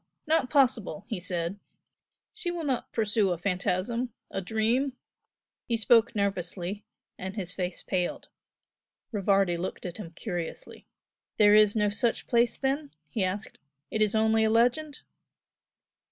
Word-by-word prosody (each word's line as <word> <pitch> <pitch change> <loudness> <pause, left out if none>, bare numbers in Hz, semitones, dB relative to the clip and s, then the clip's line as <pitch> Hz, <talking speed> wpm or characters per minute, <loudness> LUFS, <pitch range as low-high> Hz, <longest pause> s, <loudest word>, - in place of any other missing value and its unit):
not 310 -5 +2
possible!" 255 - +2
he - - -3
said 175 +1 -3 0.7
"She 430 -4 -3
will 345 -1 -3
not 265 -5 -1
pursue 215 -2 +1
a 175 - 0
phantasm, 195 +7 -1 0.2
a 195 - -2
dream!" 225 +7 +1 0.7
He 235 - +1
spoke 230 +1 +4
nervously, 195 0 -2 0.4
and 190 +2 -5
his 180 -4 -4
face 180 -2 -4
paled. 180 -2 -2 0.8
Rivardi 195 -4 +2
looked 180 +3 -5
at 180 -1 -5
him 210 -6 -7
curiously. 175 -6 -6 0.5
"There 205 -1 +7
is 210 0 +6
no 210 -1 +2
such 230 +2 0
place 235 0 +2
then?" 280 +2 -1 0.2
he 210 - 0
asked 195 +3 -3 0.3
"It 220 - -1
is 215 0 +3
only 220 0 +3
a 220 - +3
legend?" 245 +7 +2
215 Hz, 140 wpm, -28 LUFS, 185-240 Hz, 0.8 s, There